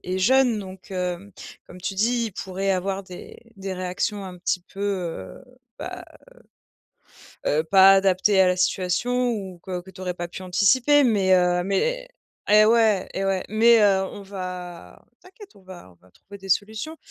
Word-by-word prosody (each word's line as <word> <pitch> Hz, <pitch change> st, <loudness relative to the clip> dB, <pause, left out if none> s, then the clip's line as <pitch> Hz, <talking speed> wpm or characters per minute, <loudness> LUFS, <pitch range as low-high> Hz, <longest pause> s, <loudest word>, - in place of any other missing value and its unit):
est 185 Hz, +1 st, -3 dB
jeune 250 Hz, +2 st, +3 dB
donc, 190 Hz, -1 st, -10 dB
hem, 180 Hz, +1 st, -4 dB, 0.3 s
comme 180 Hz, -, -14 dB
tu 190 Hz, +2 st, -4 dB
dis: 235 Hz, +4 st, +1 dB
«il 210 Hz, -, -8 dB
pourrait 195 Hz, +1 st, -2 dB
avoir 190 Hz, +1 st, -2 dB
des 180 Hz, -1 st, -11 dB, 0.2 s
des 195 Hz, -1 st, -6 dB
réactions 185 Hz, +2 st, -3 dB
un 185 Hz, -1 st, -9 dB
petit 180 Hz, 0 st, -2 dB
peu, 195 Hz, -, -8 dB
heu, 190 Hz, +4 st, -4 dB, 0.3 s
bah, 365 Hz, -1 st, -7 dB, 1.4 s
heu 150 Hz, -, +1 dB
heu, -, -, -4 dB
pas 190 Hz, +3 st, +7 dB
adaptées 195 Hz, +1 st, +3 dB
à 185 Hz, -, +5 dB
la 180 Hz, -, +1 dB
situation» 230 Hz, +8 st, 0 dB
ou 190 Hz, -6 st, -6 dB
que 185 Hz, -2 st, -5 dB
que 190 Hz, -, -14 dB
tu 185 Hz, -, -13 dB
aurais 180 Hz, -1 st, -3 dB
pas 175 Hz, 0 st, -5 dB
pu 180 Hz, +2 st, -9 dB
anticiper. 245 Hz, +10 st, +3 dB
Mais 200 Hz, -5 st, +2 dB
heu 180 Hz, 0 st, +2 dB
mais -, -, -1 dB, 0.4 s
et 210 Hz, +1 st, +6 dB
ouais 220 Hz, -3 st, +3 dB
et 195 Hz, -, -2 dB
ouais. 195 Hz, -1 st, -1 dB
Mais, 230 Hz, +2 st, +5 dB
heu, 195 Hz, -2 st, +4 dB
on 205 Hz, -, -10 dB
va 180 Hz, -, -8 dB, 0.2 s
t'inquiète, 390 Hz, +2 st, -16 dB
on 195 Hz, -, -20 dB
va 180 Hz, -, -13 dB
on -, -, -23 dB
va 90 Hz, -, -22 dB
trouver 200 Hz, -, -14 dB
des 195 Hz, 0 st, -12 dB
solutions. 220 Hz, -, -1 dB
195 Hz, 180 wpm, -23 LUFS, 185-215 Hz, 1.4 s, pas